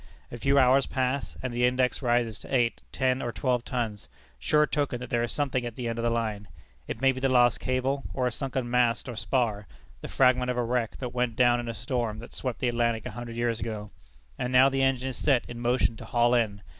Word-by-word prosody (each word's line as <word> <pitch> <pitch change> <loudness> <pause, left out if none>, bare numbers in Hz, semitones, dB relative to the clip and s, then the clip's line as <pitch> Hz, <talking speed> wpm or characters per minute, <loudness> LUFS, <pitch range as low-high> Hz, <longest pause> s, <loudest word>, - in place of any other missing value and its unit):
A 120 - -6
few 140 +4 +2
hours 130 0 +5
pass, 130 +1 -2
and 130 -2 -3
the 120 +1 0
index 125 +1 +2
rises 120 -4 +1
to - - -12
eight, 120 -3 +1
ten, 130 -1 0
or 120 - -2
twelve 125 -1 0
tons, 115 -6 -4 0.3
sure 150 -1 +3
token 145 -4 -1
that 125 - -8
there 120 - +2
is 120 -1 -2
something 135 -4 -1
at 120 -2 -5
the 125 -2 -4
end 115 0 -3
of - - -2
the 120 - +2
line 110 -3 -2 0.4
it - - -5
may 135 0 +4
be 130 - -5
the 135 0 +1
lost 120 -2 +4
cable, 130 +2 -1
or 130 - -1
a 125 - +1
sunken 130 0 -3
mast 120 0 +1
or 120 - -5
spar, 110 -3 -1 0.3
the - - -6
fragment 125 -1 +3
of 125 - -1
a 120 - +1
wreck 120 -1 -1
that 125 -2 -5
went 125 -2 -1
down 120 0 +4
in 120 -1 -4
a 115 - -4
storm 120 0 -2
that 115 - -10
swept 130 -3 -3
the 130 - -1
Atlantic 115 -2 0
a - - -4
hundred 120 -1 -7
years 120 -1 -1
ago. 105 -3 -5 0.5
And 125 - -2
now 130 +1 +6
the 135 0 -1
engine 135 -1 +1
is 130 - -6
set 135 -5 +2
in 120 - -8
motion 120 -1 +1
to 115 - -9
haul 120 +1 +2
in. 105 -4 0
120 Hz, 245 wpm, -27 LUFS, 115-130 Hz, 0.5 s, now